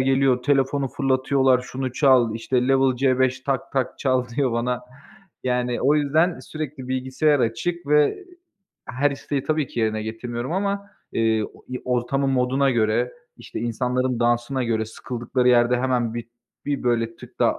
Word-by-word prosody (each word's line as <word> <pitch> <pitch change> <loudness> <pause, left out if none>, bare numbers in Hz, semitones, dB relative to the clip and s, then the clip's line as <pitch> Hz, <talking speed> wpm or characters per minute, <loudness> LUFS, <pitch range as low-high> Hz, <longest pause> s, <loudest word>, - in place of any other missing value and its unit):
geliyor, 130 -1 +2
telefonu 135 0 +1
fırlatıyorlar 130 -1 +2
şunu 130 0 -5
çal, 130 -5 +4
işte 125 +2 0
"Level 135 -1 +3
C5 130 0 +2
Tak 135 -1 -2
Tak 130 -2 -1
çal." 130 -2 +1
diyor 125 +1 0
bana. 120 +1 -1 0.6
Yani, 125 -1 0
o 140 +3 +4
yüzden, 155 +4 +2
sürekli 150 -4 -7
bilgisayar 130 +3 +1
açık 140 +10 -2
ve 150 - +3 0.6
her 140 +3 +1
isteği 140 0 -3
tabii 155 -2 0
ki 120 - -3
yerine 110 -1 0
getirmiyorum 120 +4 -5
ama, 200 +1 -2 0.2
eee, 110 -1 +2
o - - -19
i 125 0 -5
ortamın 125 +2 0
moduna 135 +1 +2
göre, 115 +1 +1 0.2
işte, - - -7
insanların 125 +1 -1
dansına 120 +2 +1
göre 110 -1 0
sıkıldıkları 125 +2 -2
yerde 120 0 +4
hemen 125 -3 0
bir, 120 -1 -5 0.4
bir, 145 -1 -1
böyle, 115 -2 0
tık - - -14
daha - - +2
130 Hz, 155 wpm, -23 LUFS, 120-135 Hz, 0.6 s, çal